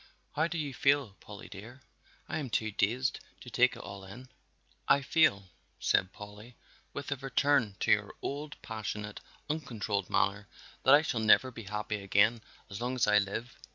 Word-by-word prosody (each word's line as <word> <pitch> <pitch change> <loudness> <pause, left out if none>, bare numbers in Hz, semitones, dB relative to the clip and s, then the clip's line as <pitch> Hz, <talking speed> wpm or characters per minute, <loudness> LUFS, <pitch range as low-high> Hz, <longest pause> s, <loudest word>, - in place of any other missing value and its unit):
How 160 +2 +1
do 170 0 -4
you 145 -4 -3
feel, 140 -5 +2
Polly 105 -1 -11
dear? 115 +7 -11 0.5
I - - -2
am 140 -4 -4
too 110 -1 0
dazed 120 +6 0 0.2
to - - -10
take - - +4
it - - -9
all 100 -1 -8
in." 120 +7 -11 0.6
"I 140 0 +4
feel," 100 - +3 0.3
said 90 - +2
Polly, 105 +3 -11 0.4
with 140 0 -6
a 145 - 0
return 135 -4 +1
to - - +2
her - - -7
old 145 +1 -5
passionate, 105 -2 -5 0.3
uncontrolled 110 - -2
manner, 100 +1 +1 0.3
"that 135 - +7
I 150 - +4
shall 120 - -1
never 110 +4 +5
be 115 -3 -9
happy 105 +1 -3
again 105 +4 +3 0.3
as 100 +2 -7
long 125 +2 -1
as 125 - +3
I 105 0 +5
live." 105 +5 -4
115 Hz, 175 wpm, -31 LUFS, 105-135 Hz, 0.6 s, that